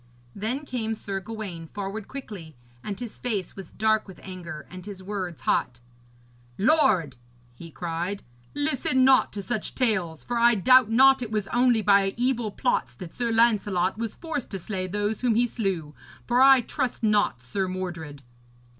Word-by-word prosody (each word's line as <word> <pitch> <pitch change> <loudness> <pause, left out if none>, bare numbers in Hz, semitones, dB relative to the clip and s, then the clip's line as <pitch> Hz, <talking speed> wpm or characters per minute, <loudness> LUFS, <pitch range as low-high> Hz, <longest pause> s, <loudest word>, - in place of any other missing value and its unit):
Then 245 +8 -3
came 225 -4 -3
Sir 195 -2 -4
Gawaine 195 -5 -7
forward 200 +3 -6
quickly, 205 - -8 0.3
and 205 -2 -5
his 240 -3 -7
face 210 -7 -3
was 190 -4 -9
dark 220 0 +1
with 190 - -12
anger 175 -4 -8
and 185 0 -9
his 195 -1 -9
words 185 -4 -5
hot. 120 -1 0 0.8
'Lord,' 200 - +3 0.4
he 165 +7 -11
cried, 175 +4 -4 0.3
'listen 260 -3 +2
not 265 -1 +5
to 200 - -4
such 220 0 -3
tales, 190 -11 0
for 240 -1 -2
I 235 0 +5
doubt 255 +3 +5
not 265 +3 +6
it 240 - -4
was 215 -2 -2
only 240 -2 +3
by 200 -1 +4
evil 240 -2 0
plots 205 - -1
that 170 +5 -9
Sir 235 -1 -1
Lancelot 210 -4 +2
was 230 -2 -3
forced 320 -6 -5
to 195 - -4
slay 185 0 -4
those 205 +3 -2
whom 245 -3 +2
he 240 +2 +4
slew. 190 -10 -3 0.3
For 245 +1 +2
I 270 -1 +8
trust 250 0 -3
not 210 - +2
Sir 185 +11 -3
Mordred.' 170 -6 -6
210 Hz, 165 wpm, -26 LUFS, 185-240 Hz, 0.8 s, I